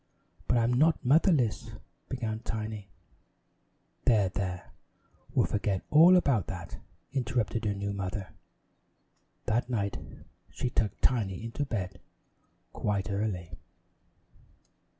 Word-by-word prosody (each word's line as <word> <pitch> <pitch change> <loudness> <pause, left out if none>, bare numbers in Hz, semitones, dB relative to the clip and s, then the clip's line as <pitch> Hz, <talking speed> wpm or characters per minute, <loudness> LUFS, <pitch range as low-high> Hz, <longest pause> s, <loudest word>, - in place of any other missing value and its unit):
"But 120 - +3
I'm 120 +1 +3
not 155 +4 +3
motherless 140 - +3 0.2
" - - -43
began 110 -4 -3
Tiny. 110 -3 -5 1.2
"There, 105 -6 +4
there, 90 -1 -4 0.6
we'll - - +4
forget 100 -2 -1
about 155 - +6
that," - - -7 0.3
interrupted 120 -3 -1
her 100 -1 0
new 100 0 -3
mother. 95 0 -4 1.2
That 120 +3 0
night 100 -5 -1 0.5
she 125 - -3
tucked 105 -3 -1
Tiny 105 -6 +1
into 115 +5 -3
bed 100 -9 -3 0.7
quite 100 0 -1
early. 100 -4 -2
110 Hz, 105 wpm, -30 LUFS, 100-125 Hz, 1.2 s, about